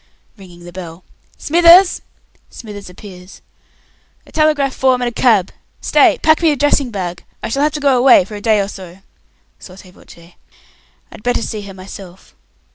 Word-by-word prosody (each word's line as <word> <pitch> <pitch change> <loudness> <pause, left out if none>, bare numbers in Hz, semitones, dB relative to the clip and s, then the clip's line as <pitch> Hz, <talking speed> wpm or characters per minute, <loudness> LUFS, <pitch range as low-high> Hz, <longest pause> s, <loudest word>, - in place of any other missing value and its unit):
[ringing 180 -4 -16
the 175 - -11
bell] 175 -1 -10 0.3
Smithers!" 345 +3 +5 0.5
[Smithers 205 -4 -11
appears.] 180 0 -14 0.8
"A - - -19
telegraph 300 -3 +1
form 260 -1 +1
and 245 -1 -1
a - - -11
cab! 220 -6 +1 0.3
Stay. - - +3
Pack 315 +1 +3
me 330 - +3
a 295 - +1
dressing 285 -1 +1
bag. 180 -5 -6 0.2
I - - -4
shall 280 +6 0
be 295 -2 -3
away 255 -6 +5
for 210 - -13
a 205 - -7
day 215 -1 +2
or 200 - -1
so. 190 -1 -12 0.6
[Sotto 185 0 -14
voce] 170 -1 -18 0.8
I'd - - -13
better 245 0 -1
see 215 - -5
her 200 -1 -11
myself. 185 -1 -13
210 Hz, 160 wpm, -16 LUFS, 185-275 Hz, 0.8 s, Smithers